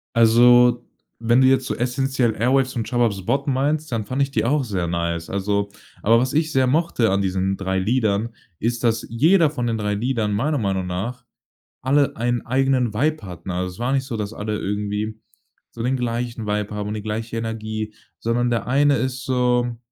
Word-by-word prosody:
Also, 120 +1 +5 0.3
wenn 120 +2 +3
du 130 - +6
jetzt 130 -1 +2
so - - -2
essenziell 125 -1 0
„Airwaves“ 130 +1 +2
und 115 -2 -2
„Shababs 115 -6 0
botten“ 140 0 0
meinst, 150 +3 0
dann 115 -3 -2
fand 130 +4 0
ich 140 - 0
die 110 -5 0
auch 140 +4 +2
sehr 95 -6 -2
nice. 85 -1 -2
Also 100 +1 -1 0.3
aber 115 +2 +5
was 130 +1 -1
ich 155 +1 +1
sehr 130 -1 +3
mochte 150 - +1
an 100 +1 +1
diesen 95 0 0
3 95 -1 -2
Liedern 110 0 +1 0.3
ist, 120 +1 -1
dass 115 -1 +1
jeder 160 +7 +4
von 125 -5 -3
den 115 -1 0
3 105 -1 -1
Liedern, 115 -2 -1
meiner 145 +8 0
Meinung 95 -3 -1
nach, 115 +8 -4 0.6
alle 140 +2 +2
einen 120 +1 -1
eigenen 130 -2 +1
Vibe 150 +5 0
hatten, 90 0 -8
also 90 +1 -2
es 90 - -14
war 120 +2 -1
nicht 135 -1 +1
so, 120 -4 -4
dass 105 +1 -4
alle 105 -1 -3
irgendwie 105 +2 -3 0.5
so 115 - -8
den 130 +2 +1
gleichen 120 -2 -3
Vibe 105 0 -2
haben 105 0 -3
und - - -3
die 105 - -4
gleiche 110 +2 -4
Energie, 110 -1 -4 0.3
sondern 120 +1 0
der 115 -1 -1
eine 140 +2 +3
ist 130 +1 -3
so, 125 -2 +1
115 Hz, 195 wpm, -22 LUFS, 105-130 Hz, 0.6 s, du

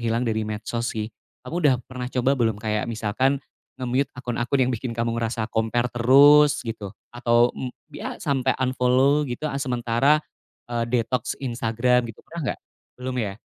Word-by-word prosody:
hilang 115 +1 0
dari 110 -1 0
medsos 110 +2 -3
sih. 110 0 -3 0.3
Kamu 165 +7 -3
udah 145 -5 +5
pernah 125 -1 -6
coba 130 +1 +1
belum 115 -5 +1
kayak 105 +1 -2
misalkan 115 +5 +1 0.4
nge-mute 130 +2 0
akun-akun 125 +1 0
yang 130 - 0
bikin 115 0 -4
kamu 115 0 0
ngerasa 115 -1 -2
compare 120 +2 0
terus, 140 +4 +6
gitu? 105 -3 -6 0.2
Atau, 120 0 +3
m 130 - -5 0.2
iya, - - -5
sampai 135 -2 0
unfollow 130 +2 +2
gitu, 120 +5 -5
ah, 140 - -3
sementara, 125 +3 +2 0.6
eee, 115 -1 0
detoks 125 +1 -1
Instagram 120 0 +1
gitu, 110 - -11
pernah 170 0 -7
enggak? - - -15 0.4
Belum 125 0 -4
ya? 100 0 -4
120 Hz, 160 wpm, -24 LUFS, 115-130 Hz, 0.6 s, terus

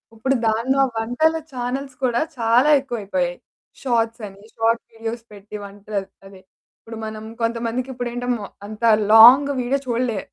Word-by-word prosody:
ఇప్పుడు 265 +4 0
దాంట్లో 245 +5 +1 0.2
వంటల 245 +9 +1 0.2
చానెల్స్ 255 +2 -4
కూడా 240 0 +1 0.2
చాలా 235 +5 +3
ఎక్కువైపోయాయి. 200 -9 -3 0.5
షార్ట్సని, 225 -5 -2
షార్ట్ 230 +1 +1
వీడియోస్ 225 +1 -6
పెట్టి 205 +1 -11
వంటలు 200 +1 -5 0.3
అదే, 195 -1 -15 0.4
ఇప్పుడు 225 0 -10
మనం 215 0 -7 0.2
కొంతమందికి 230 +2 -2
ఇప్పుడు 245 -1 -4
ఏంట 245 0 -4
మొ 205 - -7 0.2
అంత 215 +2 -10 0.3
లాంగ్ 250 +6 +9
వీడియో 265 +3 0
చూడలే 235 -3 -1
230 Hz, 135 wpm, -21 LUFS, 215-250 Hz, 0.5 s, లాంగ్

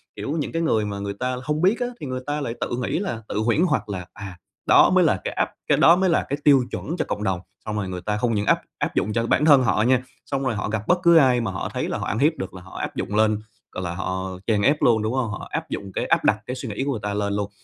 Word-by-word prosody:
kiểu, 140 - -4
những 150 - -2
cái 165 - -1
người 110 -10 +1
mà 100 -1 -4
người 100 0 -3
ta 125 +5 -2
hông 150 +3 -1
biết 195 +6 +3
á 245 - 0
thì - - -6
người 130 -1 -3
ta 145 +1 -1
lại 115 -5 -3
tự - - -1
nghĩ 105 - -1
là, 175 - -3
tự - - -4
huyễn 115 +8 +2
hoặc 170 - +1
là 95 -3 -4
"À, 95 -3 -9 0.3
đó - - +6
mới - - +4
là - - +2
cái - - -3
áp - - 0 0.2
cái - - +3
đó 170 - +7
mới 190 +1 +2
là 165 - +2
cái 140 - -1
tiêu 140 -3 +6
chuẩn 165 +5 -4
cho - - -1
cộng 105 - -3
đồng." 95 -3 0 0.3
Xong 110 - -3
rồi 100 -3 -2
người 90 -1 -5
ta 105 +2 -2
không 115 0 0
những 105 0 0
áp - - +3 0.2
áp - - -2
dụng 105 - 0
cho 115 +1 0
bản 150 - +2
thân 145 -4 +7
họ 105 -2 +2
nha, 125 +1 +3 0.2
xong 135 -1 -2
rồi 130 -4 0
họ 105 - -3
gặp 110 0 -3
bất 180 - +3
cứ 170 0 +6
ai 130 -5 +5
mà 115 -4 -2
họ 90 - -4
thấy - - -2
là - - -2
họ - - -4
ăn 110 - -1
hiếp 150 +4 +4
được 95 - -5
là 95 - -10
họ 95 +1 -12
áp - - -4
dụng 105 - -3
lên, 110 0 +3 0.3
gọi 95 - -5
là, 85 -1 -3
họ 95 +1 -3
chèn 105 -3 +2
ép 145 +7 +2
luôn, 115 -3 +4
đúng 110 +2 -1
hông? 130 -3 0
Họ 105 - -6
áp - - -3
dụng 100 -1 -5
cái - - -1
áp - - +2
đặt 105 - +3
cái 125 - -4
suy 130 -2 -6
nghĩ 105 +5 -3
của 140 - -1
người 120 - -3
ta 105 0 -2
lên 100 0 -1
luôn, 100 0 -2
110 Hz, 315 wpm, -23 LUFS, 100-140 Hz, 0.3 s, đó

